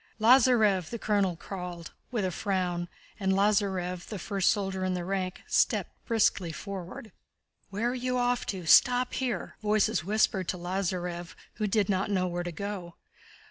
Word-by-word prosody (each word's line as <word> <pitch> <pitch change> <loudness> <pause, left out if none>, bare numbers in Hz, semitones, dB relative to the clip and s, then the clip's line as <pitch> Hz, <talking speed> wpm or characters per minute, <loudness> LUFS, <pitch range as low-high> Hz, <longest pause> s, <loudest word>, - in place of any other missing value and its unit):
"Lázarev!" 220 -6 +5
the 235 - -4
colonel 200 -5 +1
called, 180 -1 -7 0.2
with 230 -6 -1
a 185 - -1
frown, 180 -2 -1 0.3
and 190 -2 +1
Lázarev, 190 -3 +1
the 210 - -5
first 195 +1 0
soldier 190 -2 -1
in 185 0 0
the 175 -1 -3
rank, 185 -1 -3
stepped - - +1 0.2
briskly 205 -6 +2
forward. 195 +4 -7 0.6
"Where 220 +5 -1
are - - -3
you 255 0 -1
off 245 0 0
to? 185 -4 -4
Stop 250 +9 +5
here!" 255 -2 -3
voices 210 -5 +2
whispered 195 -1 +1
to 185 - -2
Lázarev 175 -1 -3 0.2
who 215 -1 0
did 205 -1 +2
not 195 0 0
know 185 -3 +1
where 175 -1 -2
to 175 0 -4
go. 185 -1 -6
195 Hz, 160 wpm, -29 LUFS, 180-215 Hz, 0.6 s, Lázarev